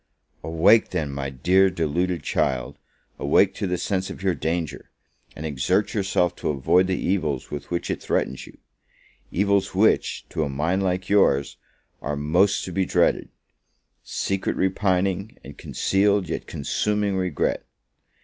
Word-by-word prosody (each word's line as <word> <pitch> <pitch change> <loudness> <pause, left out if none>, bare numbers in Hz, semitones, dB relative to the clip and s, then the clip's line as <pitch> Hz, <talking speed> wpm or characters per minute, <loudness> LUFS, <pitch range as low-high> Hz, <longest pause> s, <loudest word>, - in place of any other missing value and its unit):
Awake 90 +8 +4
then, 80 -6 -2
my 70 0 -4
dear, 90 +9 +3
my - - +3
deluded 85 +1 -1
child, 60 -2 -1 0.4
awake 95 +7 +3
to 100 - -3
the 90 0 -1
sense 95 +1 -2
of - - -8
your 95 -2 +2
danger, 80 -3 -3 0.5
and 80 - -6
exert 80 +8 0
yourself 95 -4 +1
to - - -2
avoid 75 +6 +3
the 95 -1 0
evils 80 -8 -1
with 70 -1 -6
which 85 0 -2
it - - -4
threatens 65 - -2
you: - - -15 0.7
evils 100 0 +1
which, 110 +3 +2
to 80 - -1
a 75 - -2
mind 80 +8 0
like 95 -1 -1
yours, 70 -9 +2 0.4
are 75 +2 -3
most 85 +8 +2
to 95 - -6
be 95 +2 +1
dreaded; - - +1 0.7
secret 95 -1 -2
repining, 95 +1 0
and 70 +3 -12
concealed, 100 -2 +1
yet - - -4
consuming 105 +7 -1
regret! 90 -5 -1
90 Hz, 150 wpm, -24 LUFS, 75-95 Hz, 0.7 s, Awake